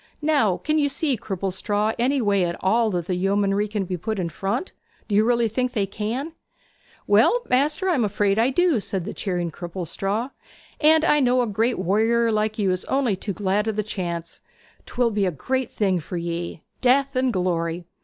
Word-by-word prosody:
Now, 280 - +2
can 310 0 0
you 285 -1 +2
see, 280 0 0
Cripplestraw, 205 +1 -2
any 265 +3 +2
way 200 -3 +2
at 170 -1 -1
all 225 +4 +2
that 175 -4 -2
the 180 - -1
yeomanry 200 +2 +1
can 205 -2 -2
be 180 0 -3
put 220 +5 -3
in 175 -3 -2
front? 195 - -3 0.3
Do 210 - -4
you 230 +3 +3
think 250 +3 -1
they 220 - 0
really - - -2
can?' 235 +10 -3 0.7
'Well, 485 0 +4
maister, 295 +8 +2
I 365 - +3
am 260 -7 +1
afraid 205 0 +1
I 235 +3 +3
do,' 330 -2 +2
said 190 -3 -3
the - - -5
cheering 175 -4 -2
Cripplestraw. 195 - -3 0.5
'And 315 +1 +5
I 295 - +4
know 250 -2 +3
a - - 0
great 225 +3 0
warrior 225 +5 +2
like 215 0 0
you 200 -3 +1
is 185 0 -2
only 265 -6 +1
too 200 +2 -5
glad 205 +2 0
o' - - +2
the 215 +1 -1
chance. 175 -5 -5 0.5
'Twill 240 -2 0
be 205 -2 +1
a - - 0
great 260 - -2
thing 190 -4 0
for 175 +3 -6
ye, 170 -1 -4 0.2
death 275 +2 +3
and 255 0 +2
glory! 175 -3 -1
210 Hz, 195 wpm, -23 LUFS, 190-250 Hz, 0.7 s, And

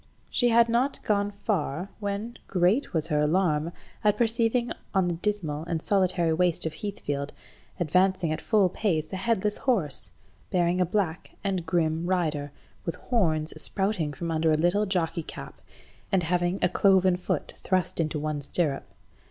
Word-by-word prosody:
She 245 - +3
had 235 0 +5
not 245 +4 +1
gone 205 -1 +1
far, 195 -4 -2
when 205 +3 -4
great 185 +8 +2
was 160 -1 -1
her 150 -2 +2
alarm 160 0 +2 0.3
at 210 -1 +3
perceiving 235 +1 +1 0.2
on 190 -2 +3
the 175 - 0
dismal 165 -5 -2
and 170 -1 -1
solitary 180 -3 +2
waste 175 0 +2
of 160 - -2
Heathfield, 145 -8 -4 0.5
advancing 180 0 +2
at 155 - -2
full 210 -4 +3
pace, 175 -4 -1
a - - -1
headless 210 0 0
horse, 175 - 0 0.4
bearing 175 0 +2
a 180 - +2
black 180 -3 -2
and 190 -4 -1
grim 160 0 +1
rider, 155 -6 0 0.3
with 170 - -3
horns 160 -10 0
sprouting 190 -6 0
from 165 +4 -4
under 160 0 +2
a 155 - +4
little 180 +6 +2
jockey–cap, 170 -3 -3 0.5
and 190 -3 +3
having 175 +2 +1
a - - +6
cloven 190 -1 +4
foot 180 - -3
thrust 185 -3 0
into 155 -1 0
one 150 0 -2
stirrup. 145 -1 0
180 Hz, 155 wpm, -27 LUFS, 160-200 Hz, 0.5 s, a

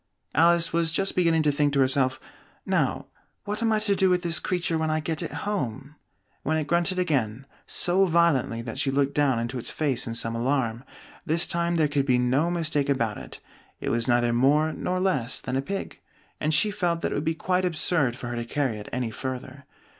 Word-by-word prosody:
Alice 170 +2 +4
was 165 -1 +1
just 195 +4 -1
beginning 165 -3 +3
to 150 - +3
think 145 0 +1
to 140 - +2
herself, 130 0 +2 0.5
"Now, - - 0 0.4
what 210 +2 -4
am 225 -1 +2
I 215 - +3
to 200 -1 +1
do 190 -1 +3
with 180 0 +1
this 170 -2 +2
creature 175 -2 -1
when 160 0 0
I 155 0 +1
get 155 0 -3
it - - -4
home?" 145 - -3 0.5
when 160 - 0
it 155 - -1
grunted 175 +4 +1
again, 135 -9 -1 0.2
so 185 +2 +2
violently 165 -9 +2
that 115 +2 -6
she 140 - +1
looked 140 +1 +1
down 140 -4 +2
into 120 +2 -3
its - - -6
face 135 -7 -1
in 115 - -4
some 115 0 -2
alarm. 120 -1 -1 0.4
This 165 +2 +3
time 170 0 0
there 160 -2 +3
could 140 -1 -1
be 125 -2 +4
no 130 +7 +2
mistake 160 -5 0
about 115 -6 0
it: - - -11 0.4
it - - -3
was 115 +1 0
neither 120 -1 +2
more 150 +6 +3
nor 185 +4 -2
less 155 -11 0
than 130 - -4
a 135 - +1
pig, 195 +7 -5 0.4
and 155 - 0
she 165 +8 +3
felt 175 -5 -1
that - - -1
it - - -1
would 145 - -1
be 160 +1 0
quite 185 +2 0
absurd 160 -6 +1
for 120 -1 -6
her 120 - -4
to 120 - -2
carry 130 -3 -1
it 105 - -9
any 125 -3 -2
further. 130 +2 -6
150 Hz, 215 wpm, -26 LUFS, 130-170 Hz, 0.5 s, Alice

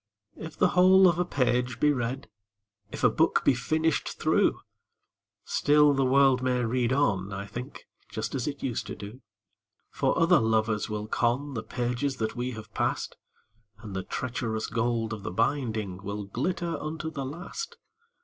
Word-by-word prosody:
II. - - -8
If 160 - -9
the - - +4
whole 185 +1 +6
of 170 -1 +2
a 180 - +2
page 125 -5 0
be 150 +2 +4
read, 125 +1 -3 0.6
If - - -7
a - - +7
book - - +2
be - - +6
finished 155 +6 -1
through, - - +2 0.9
Still 150 0 +4
the 135 0 +1
world 135 0 +4
may 125 -1 +1
read 120 +1 0
on, 100 -9 +1
I 100 0 -5
think, 120 +5 -8 0.2
Just - - -4
as 130 -4 -2
it 145 -1 -5
used 125 -4 -2
to - - -5
do; 105 +6 -10 0.7
For - - 0
other 170 0 +5
lovers 110 -1 +1
will 105 0 -3
con 125 +6 0
The 115 - -3
pages 125 +4 -2
that 110 0 -3
we 125 +1 -3
have 110 -1 -10
passed, - - -1 0.7
And 100 -3 -7
the 95 - -1
treacherous 115 -2 -3
gold 115 -1 -1
of 105 - -6
the - - -4
binding 110 -3 -1
Will 100 +1 -4
glitter 170 - -2
unto 160 +1 -4
the 140 -3 -4
last. 180 - -6
125 Hz, 170 wpm, -28 LUFS, 110-145 Hz, 0.9 s, a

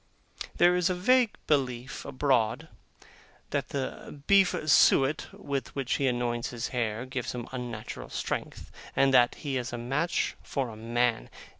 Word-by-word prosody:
There 175 +1 +5
is 180 0 +2
a 180 - 0
vague 245 +5 +3
belief 130 -4 -1
abroad, 130 -5 0 0.8
that - - -1
the 140 +1 -5
beef 195 -2 +5
suet 145 0 +4
with 140 -4 -5
which 135 -2 -1
he 140 - +1
anoints 120 -1 -1
his 120 -1 -4
hair 115 -2 -2
gives 130 -2 -4
him 120 -2 -5
unnatural 120 -4 -6
strength, - - -4 0.2
and 135 -1 +4
that 120 -2 +5
he 140 -4 -3
is 125 0 -3
a 120 - -4
match 135 +8 -1
for 135 -4 -3
a 110 - -9
man. 115 - 0
130 Hz, 150 wpm, -28 LUFS, 120-145 Hz, 0.8 s, There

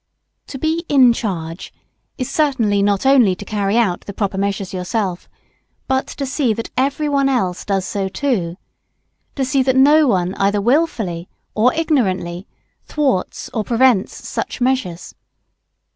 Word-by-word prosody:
To 270 - -7
be 320 +4 -1
"in 260 -4 +6
charge" 170 -7 -5 0.5
is 255 - -3
certainly 240 -10 +1
not 200 +3 +1
only 250 -9 +5
to 205 - -10
carry 205 +1 0
out 200 -7 +1
the 200 - -8
proper 200 -2 -2
measures 195 0 -2
yourself 185 0 -3 0.6
but 265 0 0
to 280 - -5
see 265 -4 0
that 230 - -6
every 280 +3 0
one 280 -1 +2
else 190 -9 -1
does 195 -2 -1
so 195 -1 -2
too; 190 -9 -2 0.8
to 270 - 0
see 265 +1 +1
that 260 0 +1
no 295 +3 +5
one 185 -5 +1
either 200 +1 +2
wilfully 215 - 0 0.2
or 230 +4 +3
ignorantly 195 - -1 0.4
thwarts 270 -11 -2
or 220 - -1
prevents 235 -3 +1
such - - -4
measures. 245 -9 -1
225 Hz, 145 wpm, -19 LUFS, 190-265 Hz, 0.8 s, in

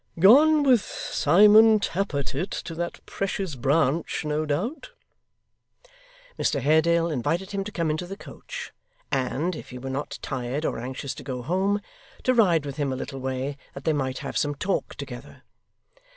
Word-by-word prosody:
'Gone 290 - +7
with 255 -6 +5
Simon 210 +4 +5
Tappertit 175 -4 -2
to 165 - -5
that 170 +1 -5
precious 195 -3 -3
Branch, 140 +4 0
no 150 +1 -1
doubt.' 230 - -2 1.5
Mr - - +1
Haredale 165 +2 +3
invited 165 +8 -1
him 200 -1 -2
to 210 - -7
come 165 -5 0
into 155 +3 -3
the 195 +2 -7
coach, - - -9 0.4
and, 150 +7 -1
if - - -9
he 125 - -8
were 135 +1 -5
not 140 +2 -4
tired 130 +4 -3
or - - -1
anxious 130 +2 -5
to - - -10
go 125 -3 -5
home, 195 - 0 0.4
to 255 - +3
ride 175 - +3
with 140 0 -6
him 145 -2 0
a - - -2
little 135 +1 -6
way 130 +2 -3 0.2
that 140 - -8
they 160 - +2
might 130 -3 -2
have - - -5
some 145 -1 0
talk 190 +6 -2
together. 135 -1 -9
160 Hz, 165 wpm, -25 LUFS, 135-195 Hz, 1.5 s, Gone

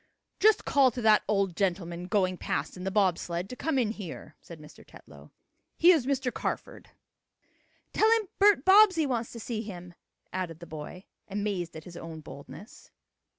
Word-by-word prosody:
"Just 435 0 +4
call 275 -2 +4
to 245 +1 -6
that 215 -2 +5
old 195 -4 0
gentleman 175 -2 -2
going 185 -2 +1
past 145 -3 -3
in 180 0 -8
the - - 0
bob 190 -4 +2
sled 175 +1 -4
to - - -6
come 300 +2 -1
in 230 -5 +1
here," 185 -7 -8
said 170 -2 -12
Mr. 150 0 -14
Tetlow. - - -16 0.5
"He 345 +2 +7
is 300 -8 +2
Mr. 260 -3 -1
Carford." - - -5 1.0
"Tell 435 - +4
him 445 -3 0
Bert 400 -8 +5
Bobbsey 380 -4 +6
wants 240 -4 -2
to 230 - -8
see 220 0 -4
him," 180 -5 -9 0.4
added 180 -3 -4
the 170 - -10
boy, 160 +4 -9 0.2
amazed 200 -4 -3
at 160 - -8
his 175 0 -11
own 160 -1 -8
boldness. 155 +9 -12
200 Hz, 175 wpm, -28 LUFS, 175-255 Hz, 1.0 s, He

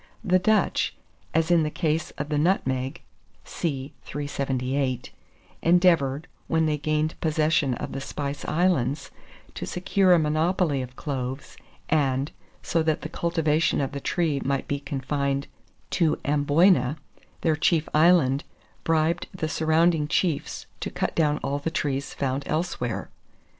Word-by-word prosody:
The 185 -3 +3
Dutch, 210 +2 +2 0.4
as 160 +1 +1
in 170 -1 +5
the 155 - 0
case 160 -1 -1
of 145 +1 -4
the 150 -1 +1
nutmeg 135 -6 0 0.4
(see 140 -3 -3
378), 135 -2 -2 0.5
endeavoured, 165 -4 +3 0.2
when 160 0 +2
they 150 -1 0
gained 155 +1 -1
possession 155 -4 +2
of - - -5
the 135 - -4
Spice 140 +1 -4
Islands, 155 -5 +1 0.4
to - - -5
secure 185 +1 +2
a - - +6
monopoly 155 -1 +1
of 125 0 -8
cloves, 135 -1 -4 0.3
and, 140 -2 +1 0.3
so 170 - +1
that 160 -1 0
the - - -5
cultivation 165 -2 +1
of 135 -2 -1
the 140 - -4
tree 155 -5 0
might 140 0 -1
be 140 - -1
confined 140 0 -2 0.5
to 165 -4 +2
Amboyna, 145 0 +3 0.4
their 160 -2 +2
chief 160 0 +2
island, 155 -4 +4 0.4
bribed 165 +1 +1
the 155 - -2
surrounding 160 0 +2
chiefs 160 -1 -1
to - - -3
cut - - -2
down 150 -2 +2
all 140 +1 -1
trees 145 -3 -2
found 135 0 -1
elsewhere. 155 -8 -2
150 Hz, 135 wpm, -25 LUFS, 140-165 Hz, 0.5 s, a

